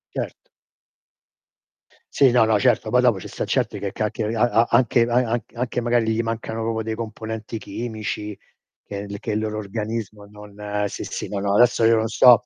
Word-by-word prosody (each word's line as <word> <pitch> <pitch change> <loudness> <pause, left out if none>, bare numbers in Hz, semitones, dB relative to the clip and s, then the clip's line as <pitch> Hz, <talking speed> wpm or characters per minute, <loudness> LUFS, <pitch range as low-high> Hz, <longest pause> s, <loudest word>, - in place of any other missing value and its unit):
Certo. - - -5 1.7
Sì, 135 -2 +6
no, 120 -1 +5
no, 110 -2 +3
certo, 110 - +2
poi 125 0 +5
dopo 120 -6 +3
ci - - -8
sta - - -4
certi - - -1
che 100 - -3
ca 105 +1 -2
che 115 - -3
a 115 - +2
a 120 -1 +3
anche 120 0 +4
a 120 - 0 0.2
anch 120 0 -1
anche 120 0 -2
magari 120 -1 +2
gli 115 - +1
mancano 115 0 -3
proprio 110 0 -1
dei 110 0 -3
componenti 110 0 -5
chimici 105 -1 -5 0.5
che 100 - -7
il 100 - -5
che 110 - -4
il 105 - 0
loro 110 0 -3
organismo 105 0 -4
non 105 0 -5
sì, - - -6
sì, - - -5
no, 100 - -3
no 100 0 0
adesso 120 +1 +4
io 115 0 +6
non 110 0 +1
sto 125 +1 +6
110 Hz, 200 wpm, -23 LUFS, 105-115 Hz, 1.7 s, Sì